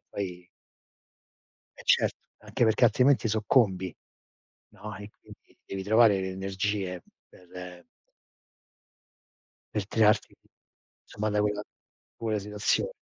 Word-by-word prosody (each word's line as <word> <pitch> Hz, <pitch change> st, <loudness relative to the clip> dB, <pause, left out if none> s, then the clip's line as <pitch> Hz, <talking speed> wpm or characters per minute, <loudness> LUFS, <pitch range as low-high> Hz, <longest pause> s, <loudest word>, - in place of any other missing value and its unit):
poi 90 Hz, -3 st, -5 dB, 1.3 s
Eh, -, -, -10 dB
certo, -, -, +3 dB, 0.2 s
anche 120 Hz, -, -1 dB
perché 110 Hz, +2 st, +3 dB
altrimenti 125 Hz, +1 st, +4 dB
soccombi, 105 Hz, -4 st, +2 dB, 0.8 s
no 105 Hz, -3 st, -9 dB
e 105 Hz, +1 st, -10 dB
quindi -, -, -18 dB
devi 95 Hz, 0 st, -5 dB
trovare 105 Hz, -1 st, +5 dB
le 95 Hz, 0 st, -3 dB
energie 95 Hz, -1 st, -3 dB, 0.3 s
per 90 Hz, 0 st, -11 dB, 1.9 s
per 105 Hz, -3 st, -1 dB
tirarti, 105 Hz, 0 st, +2 dB, 0.7 s
somma, 105 Hz, +1 st, -3 dB
da 105 Hz, -, +1 dB
quella 105 Hz, 0 st, 0 dB, 0.6 s
quella 110 Hz, -2 st, -1 dB
situazio 105 Hz, -, -1 dB
105 Hz, 100 wpm, -28 LUFS, 95-110 Hz, 1.9 s, trovare